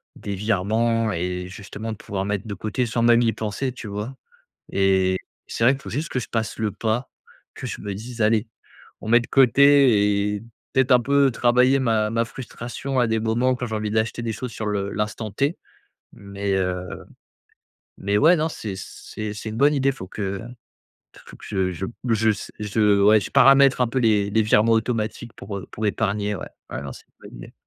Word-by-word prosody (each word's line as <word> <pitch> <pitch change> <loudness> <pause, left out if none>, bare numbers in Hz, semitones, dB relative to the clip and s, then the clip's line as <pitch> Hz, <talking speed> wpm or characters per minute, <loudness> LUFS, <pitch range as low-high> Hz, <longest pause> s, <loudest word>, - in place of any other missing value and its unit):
des 100 - -5
virements 110 +3 +1
et 90 0 -3
justement 100 +3 -7
de 110 - -6
pouvoir 95 -2 -4
mettre 100 0 -2
de 105 - -4
côté 110 +5 -2
sans 115 +1 -1
même 120 0 +5
y 115 -1 +2
penser, 110 +5 -3
tu 120 -2 -9
vois? 105 +6 -5 0.6
Et 95 -1 +2 0.3
c'est - - -3
vrai 130 - +6
qu'il 140 - -8
faut - - -7
juste 155 +5 -3
que - - -3
je 120 - -6
passe 115 -3 -2
le 110 -2 -1
pas, 110 +5 -2 0.4
que - - -7
je - - -6
me 100 - -5
dise: 115 +4 -7
«Allez, 110 +1 +2 0.5
on - - -8
met 120 +1 +6
de 120 - -7
côté» 120 -7 +4
et - - -9 0.3
peut-être 130 0 +2
un 125 - +6
peu 140 +2 +3
travailler 125 +3 +3
ma 110 -4 +1
ma 115 +1 0
frustration 125 +2 -5
à 125 - +4
des 110 0 0
moments 115 +4 +1
quand 125 0 -4
j'ai 110 - -4
envie 105 -1 -2
d'acheter 110 +2 -1
des 115 - -2
choses 125 +2 -5
sur 110 - -5
le 100 -1 -1
l'instant 105 +1 -3
T. 140 - 0 0.6
Mais 100 0 -4
heu 90 -1 -3 1.0
mais 100 +1 0
ouais 160 +9 +6
non 160 +1 0
c'est 110 -9 -6
c'est 105 +2 -7
c'est 110 +1 -6
une 110 - -6
bonne 145 +3 +4
idée 135 0 +2
faut 120 -8 -9
que 100 0 -4 0.8
f - - -15
faut - - -12
que - - -14
je 95 -2 -1
je 90 +3 -4 0.2
je 110 -1 +3
s 105 - -5
je 105 -1 +2
ouais, 105 +2 +6
je - - -6
paramètres 135 0 +6
un 125 - +3
peu 130 - -1
les 105 -4 +2
les 110 +2 +3
virements 110 +1 +3
automatiques 115 0 -1
pour, 100 0 -6
heu 95 - -9
pour 110 - -5
épargner 105 0 -1
ouais, - - -7 0.2
ouais. - - -5
Non 70 -1 -6
c'est - - -14
une - - -16
bonne - - -13
idée. - - -11
110 Hz, 210 wpm, -23 LUFS, 100-120 Hz, 1.0 s, vrai